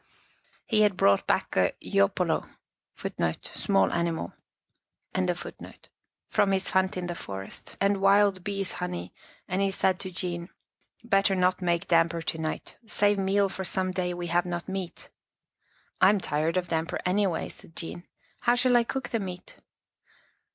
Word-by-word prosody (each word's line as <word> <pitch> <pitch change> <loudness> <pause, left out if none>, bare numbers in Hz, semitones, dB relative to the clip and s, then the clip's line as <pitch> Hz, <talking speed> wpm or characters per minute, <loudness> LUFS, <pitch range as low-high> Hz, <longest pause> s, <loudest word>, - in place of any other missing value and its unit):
He 215 -2 +2
had 205 -3 +3
brought 100 0 +4
back - - 0
a - - +3
yopolo 100 0 +2 0.6
1 80 -1 -1 2.9
from 195 - +2
his 190 -1 +1
hunt 190 0 +2
in 180 - -2
the 175 - -3
forest, 95 - -8
and 200 0 +3
wild 195 -1 +4
bee's 195 -1 -1
honey, 180 0 -5 0.3
and 185 +2 0
he 195 - +3
said 190 -1 +1
to 190 - -4
Jean, 175 -1 -4 0.3
" - - -42
Better 195 -3 +3
not 185 0 +2
make 175 +1 +1
damper 165 0 +3
to 160 - -2
night. 155 -1 -4
Save 205 -1 +2
meal 195 +1 +3
for 190 0 -5
some 185 0 -1
day 180 -1 -1
we 175 0 -4
have 175 +1 +1
not 175 -1 -4
meat.,, 190 -2 -5 0.5
" - - -39
I 190 - +8
am 205 0 +3
tired 160 +1 0
of 180 -1 -1
damper 165 0 -1
anyway," 185 -2 +1
said 165 - -10
Jean. 175 +1 -6 0.2
" - - -36
How 240 0 +3
shall 245 0 +4
I 240 - +4
cook 265 +1 -4
the 230 - 0
meat? 185 -3 -7
185 Hz, 160 wpm, -28 LUFS, 175-195 Hz, 2.9 s, I